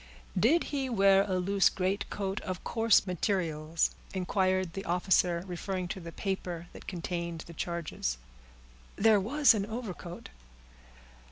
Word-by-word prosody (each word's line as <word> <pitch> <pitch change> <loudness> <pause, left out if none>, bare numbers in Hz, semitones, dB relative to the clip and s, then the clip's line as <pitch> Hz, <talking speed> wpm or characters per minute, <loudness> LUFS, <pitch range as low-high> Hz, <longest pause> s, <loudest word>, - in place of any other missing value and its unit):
"Did 260 - +4
he 270 -2 -1
wear 195 -4 +5
a 185 -2 0
loose 195 +2 +3
greatcoat 195 +1 -2
of 185 -1 -5
coarse 225 -3 +3
materials?" 165 -4 0 0.2
inquired 185 -1 +1
the 195 - -5
officer, 175 -1 +2
referring 185 0 -3
to 190 - -4
the 170 -2 -8
paper 180 -3 -3
that - - -12
contained 170 -2 -4
the 170 - -11
charges. 170 - -3 0.8
"There 215 0 +5
was 270 +8 +4
an 205 -2 -1
overcoat." 210 -6 -6
185 Hz, 125 wpm, -30 LUFS, 175-200 Hz, 0.8 s, wear